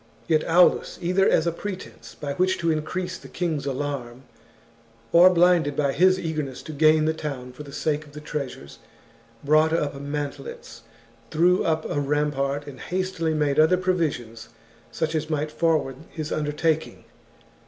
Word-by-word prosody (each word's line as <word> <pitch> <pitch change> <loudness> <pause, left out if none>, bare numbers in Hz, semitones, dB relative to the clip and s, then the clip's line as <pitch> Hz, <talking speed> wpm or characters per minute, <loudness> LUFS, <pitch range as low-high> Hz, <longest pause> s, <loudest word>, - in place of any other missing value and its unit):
Yet 155 -2 +3
Aulus, 175 +2 +4
either 185 +3 +2
as 160 - +3
a 170 - +1
pretence 190 +3 -8
by 140 -1 -4
which 185 +4 +1
to 170 -2 +1
increase 180 +4 -3
the - - -12
king's 160 -5 -2
alarm, 135 -3 -4 0.9
or 175 +2 +8
blinded 175 -5 +3
by 140 -2 +1
his 185 +4 +4
eagerness 155 -6 -4
to 155 - -7
gain 155 +1 +4
the 160 - +2
town 140 -5 -6
for 125 - -11
the 145 -1 -9
sake 150 +1 -2
of 145 - -17
the 150 - -8
treasures, 130 - -6 0.6
brought 155 +2 +4
up 150 -3 0
mantlets, 140 -4 -6 0.5
threw 175 +3 +3
up 160 -1 0
a - - -1
rampart, 145 -1 -1
and 140 -3 -10
hastily 180 -3 -2
made 145 -2 +1
other 160 +4 +5
provisions 150 -12 -2 0.4
such 160 0 -2
as 155 -1 -1
mi^ht 155 -1 -2
forward 155 -6 0
his 155 -2 -6
undertakincr. 155 +1 -1
155 Hz, 155 wpm, -24 LUFS, 145-170 Hz, 0.9 s, or